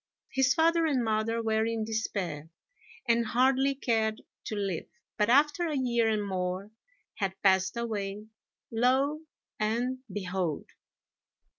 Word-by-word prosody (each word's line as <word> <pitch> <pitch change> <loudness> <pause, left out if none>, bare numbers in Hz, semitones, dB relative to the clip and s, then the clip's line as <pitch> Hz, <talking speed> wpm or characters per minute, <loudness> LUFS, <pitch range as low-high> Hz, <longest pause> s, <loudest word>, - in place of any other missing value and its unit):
His 260 -1 +3
father 330 0 +3
and 265 -5 +1
mother 225 +1 0
were 220 0 +1
in 225 -1 -1
despair, 190 -8 -3 0.6
and 235 0 +3
hardly 265 +4 +2
cared 220 -4 0 0.2
to 215 - -3
live; 195 -5 -2 0.3
but 210 +1 +1
after 295 +6 +4
a 300 -3 -1
year 235 -3 +2
and 210 -2 0
more 185 +1 -3 0.5
had 195 -2 -2
passed 190 +2 +3
away, 210 -3 -3 0.5
lo 260 +6 +2 0.4
and 240 +4 0
behold! 185 -5 -2
225 Hz, 125 wpm, -29 LUFS, 200-255 Hz, 0.6 s, after